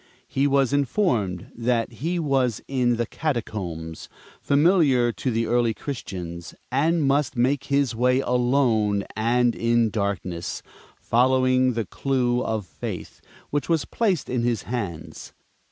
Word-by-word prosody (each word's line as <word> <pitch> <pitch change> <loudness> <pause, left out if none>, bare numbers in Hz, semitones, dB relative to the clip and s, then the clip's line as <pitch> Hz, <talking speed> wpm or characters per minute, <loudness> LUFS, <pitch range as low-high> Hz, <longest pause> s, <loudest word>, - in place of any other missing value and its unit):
He 140 +2 +1
was 140 -1 +2
informed 125 - 0
that 120 0 0
he 160 +10 -3
was 135 -8 +1
in 125 -3 +1
the 120 0 -1
Catacombs, 95 - -4 0.3
familiar 140 -5 +3
to 110 +5 -3
the 115 -1 0
early 120 -2 +1
Christians, 90 - -6 0.2
and 155 +5 +2
must 140 0 +1
make 135 +3 +1
his 140 -3 +1
way 125 +3 +2
alone 120 -5 +2
and 120 +2 +2
in 115 -1 +1
darkness, 95 -4 -3 0.4
following 130 +1 +3
the 115 -2 -2
Clue 125 +1 0
of 110 -3 -2
Faith - - -7 0.3
which 145 +2 -1
was 165 -3 +2
placed 200 -9 0
in 125 -1 -1
his 120 -4 0
hands. 95 -7 -5
125 Hz, 130 wpm, -24 LUFS, 110-140 Hz, 0.4 s, familiar